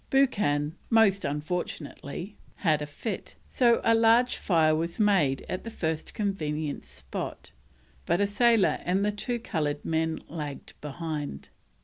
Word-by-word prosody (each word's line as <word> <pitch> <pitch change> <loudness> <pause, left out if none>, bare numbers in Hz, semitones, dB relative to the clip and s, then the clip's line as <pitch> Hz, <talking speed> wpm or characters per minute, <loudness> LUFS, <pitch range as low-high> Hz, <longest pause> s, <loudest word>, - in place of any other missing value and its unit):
Buchan, 180 - +2 0.2
most 215 -4 +4
unfortunately, 155 +3 -4 0.2
had 155 -5 +1
a 150 - -3
fit, 185 +8 -5 0.2
so 235 -2 +4
a 230 - +5
large 230 +2 +4
fire 160 -4 +3
was 170 +4 -2
made 190 -11 +3
at 185 - -4
the 230 - -5
first 160 -7 -3
convenient 155 -8 -2
spot, 65 -1 -6 0.6
but 175 - +2
a 205 - +4
sailor 225 +1 +3
and 190 +3 +1
the 210 - +2
two 240 +4 -2
coloured 150 -9 -2
men 160 0 0
lagged 150 -3 -6
behind. 150 - -5
170 Hz, 135 wpm, -28 LUFS, 150-210 Hz, 0.6 s, a